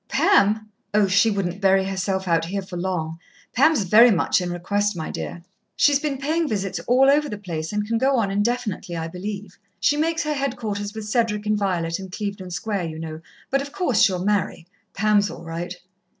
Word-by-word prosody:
"Pam! 215 +2 +3 0.3
Oh, 210 -1 +5
she 200 +4 +4
wouldn't 195 -2 -2
bury 195 0 +4
herself 190 0 -2
out 165 -1 +2
here, 195 +3 -3
for 185 -1 -9
long. 170 -3 -3 0.3
Pam's 280 -2 +4
very 220 +6 +7
much 180 -2 +2
in 180 - -3
request, 205 +4 -1
my 160 - -4
dear. 170 - -6 0.3
She's 285 -1 +4
been 285 -2 -2
paying 315 +4 0
visits 195 -5 -2
all 255 +3 +5
over 295 +2 +3
the 210 - -5
place, 165 -5 -5
and 210 0 -1
can 230 0 0
go 270 +2 +3
on 205 -4 +1
indefinitely, 205 -4 -1
I 165 0 -3
believe. 195 +2 -7 0.2
She 290 +9 +2
makes 325 +1 0
her 300 0 -1
headquarters 215 -7 -3
with 220 -1 -6
Cedric 215 -2 0
and 215 0 +2
Violet 180 -4 -1
in 190 -1 -8
Clevedon 200 -1 -5
Square, 195 +1 -2
you 160 -1 -7
know, 160 0 -6 0.3
but 275 +1 +2
of 280 +1 -7
course 265 - +1
she'll 190 -5 +3
marry. 200 -5 0 0.3
Pam's 205 0 +3
all - - -9
right." 170 +2 -5
200 Hz, 195 wpm, -23 LUFS, 180-230 Hz, 0.3 s, very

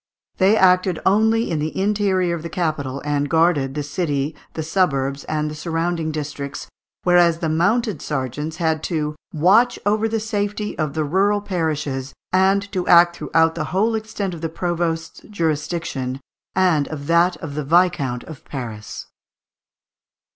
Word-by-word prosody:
They 200 +3 +4
acted 185 -2 +4
only 220 +3 +3
in 160 - 0
the 155 +4 -3
interior 195 -3 +1
of 165 - -6
the 170 - -6
capital, 155 -6 -2
and 145 -1 0
guarded 160 -5 +2
the 150 - -2
city, 145 -1 -2 0.2
the 160 - -2
suburbs, 140 -5 0
and 155 -1 -1
the 150 - -5
surrounding 165 +1 -2
districts, 145 -2 -5 0.4
whereas 175 -2 +4
the 165 -1 -2
mounted 185 - +1
sergeants 150 +3 -3
had 160 -3 0
"to 150 -3 -2 0.2
watch 205 +9 +4
over 215 +2 +2
the 225 0 0
safety 210 -1 -2
of 155 -2 -1
the 155 - 0
rural 195 +6 +2
parishes, 150 -8 -2 0.2
and 195 +2 +3
to 185 -3 -2
act 170 0 +6
throughout 165 0 +2
the 160 -2 -3
whole 210 +7 +1
extent 215 -3 -3
of 165 - -8
the 165 - -2
provost's 165 -1 -2
jurisdiction, 155 -7 -2 0.4
and 180 -6 +3
of 145 -3 -6
that 170 +3 +3
of 150 -3 -7
the 150 +1 -3
viscount 155 -5 +2
of 155 -4 -11
Paris." 115 -6 -7
165 Hz, 155 wpm, -21 LUFS, 150-190 Hz, 0.4 s, act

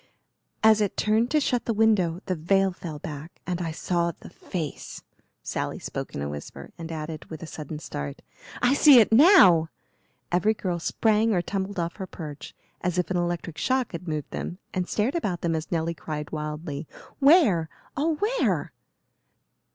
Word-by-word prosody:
"As 220 -1 +6
it 205 - -1
turned 220 +3 +2
to 305 - +3
shut 250 -4 0
the 230 - -1
window 195 -6 +2
the 185 - -1
veil 195 +4 +2
fell 170 -4 -7
back 150 +2 -8
and 180 -1 -2
I 165 - -2
saw 170 +2 0
the - - -14
face." 160 -6 -6 0.4
Sally - - -3
spoke - - -6
in 70 - -3
a - - -2
whisper 75 0 -8
and 165 0 -7
added, 155 -1 -5
with 160 0 -9
a - - -4
sudden 155 -1 -7
start, 70 - -6 0.4
"I 245 +2 +5
see 285 -2 +8
it 220 - +4
now!" 210 - +7 0.6
Every 180 +5 +2
girl 180 -4 -2
sprang 220 +4 +2
or 175 - +1
tumbled 195 +1 -3
off 170 0 -2
her 190 -3 -5
perch 150 -5 -8 0.3
as 180 0 -1
if 180 +1 0
an 180 - +1
electric 175 -2 -2
shock 260 -2 0
had 170 +1 -7
moved 155 -3 -3
them, 175 - -5 0.2
and 180 -1 -2
stared 220 +6 0
about 195 - -2
them 170 -1 0
as 160 0 -4
Nelly 165 0 0
cried 150 -1 -6
wildly, 150 -1 -5 0.3
"Where? 270 - +5 0.3
oh, 310 +3 +1
where?" 440 +10 0
175 Hz, 175 wpm, -26 LUFS, 160-215 Hz, 0.6 s, see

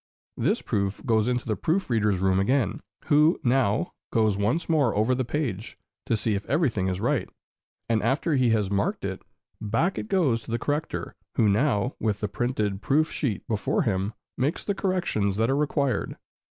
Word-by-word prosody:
This - - 0
proof 100 +3 -2
goes 110 -3 +2
into 125 -1 0
the 110 - 0
proof 175 - 0
reader's 105 -5 +2
room 95 0 +2
again, 115 +1 +1 0.3
who 150 +3 +4
now 120 -4 +1 0.2
goes 110 -3 +2
once 105 +12 0
more 145 -9 +2
over 110 +5 +2
the 130 +1 0
page, 120 -6 -3 0.3
to 115 - +2
see 110 +1 0
if 100 0 -2
everything 130 - +1
is 90 0 -1
right; - - 0 0.6
and 115 -2 +1
after 155 +4 +1
he 130 -3 +3
has 105 -3 +1
marked 100 0 0
it, - - -4 0.4
back 115 - 0
it - - -5
goes 160 - +2
to 110 - -13
the 115 - 0
corrector, 145 +6 -3 0.2
who 110 - +3
now, 115 +3 +2
with 105 -2 -1
the 105 - -1
printed 105 -3 -2
proof 155 +6 +2
sheet 115 - -2
before 110 -3 0
him, 100 +1 -1 0.2
makes 145 +8 -1
the 200 - 0
corrections 175 - 0
that 115 +4 +1
are - - +2
required. 140 -2 0
115 Hz, 180 wpm, -26 LUFS, 105-140 Hz, 0.6 s, who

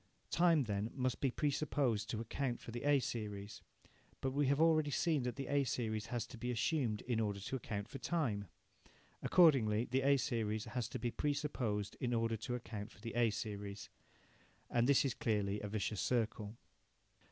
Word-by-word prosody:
Time 170 -4 +4
then 105 -1 -2
must 130 -2 -1
be 135 - +3
pre 145 +3 0
supposed 125 -8 0
to 110 - -2
account 120 +2 -2
for - - -9
the 120 +3 -5
A 145 -1 +5
series. 105 -5 -4 0.6
But 135 - -1
we 140 +1 +2
have 140 +2 +2
already 155 -2 +4
seen 155 0 +1
that 125 0 -2
the 135 - -4
A 140 0 +2
series 110 -3 -2
has 120 0 -2
to 115 - -11
be 125 - -3
assumed 120 -2 0
in 120 -3 -1
order 105 -2 -1
to 100 +7 -4
account 105 -5 -4
for 135 - -8
time. 120 - -1 0.7
Accordingly 125 - +5
the 130 +2 +1
A 140 +1 +5
series 110 -5 -1
has 115 -1 -3
to - - -4
be 120 - -2
pre 145 +3 0
supposed 115 -9 -2
in 120 -1 0
order 115 0 +1
to 115 +3 -3
account 110 -3 -6
for - - -17
the 115 +1 -6
A 120 -1 +3
series. 100 -1 -5 0.8
And 120 +2 +3
this 140 0 +5
is 135 - +1
clearly 105 -5 0
a 105 - -3
vicious 105 -1 -1
circle. 110 -2 -1
120 Hz, 190 wpm, -37 LUFS, 105-135 Hz, 0.8 s, A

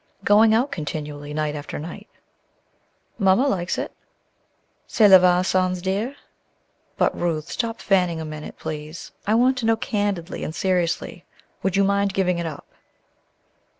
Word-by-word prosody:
"Going 215 +2 +5
out 255 +5 +1
continually 150 - -5
night 150 0 -1
after 145 -1 -6
night." 175 +7 -8 1.1
"Mamma 195 +7 +4
likes 185 -7 -1
it." - - -3 1.0
"Cela 200 -4 +7
va 180 0 +4
sans 185 -1 +1
dire. 200 +9 -2 0.8
But, - - +2
Ruth, 165 -2 -2
stop 230 -1 -3
fanning 180 -4 +1
a 160 - -4
minute, 155 0 -8
please, 155 +1 -7 0.2
I 215 - +3
want 250 +2 +3
to 225 - -1
know, 225 - +4
candidly 205 -6 -2
and 155 - -5
seriously, 180 -3 -1 0.4
would 190 -1 0
you 200 - +4
mind 200 0 +1
giving 180 -2 +1
it 170 - -2
up?" 150 -3 -8
185 Hz, 145 wpm, -23 LUFS, 160-205 Hz, 1.1 s, Cela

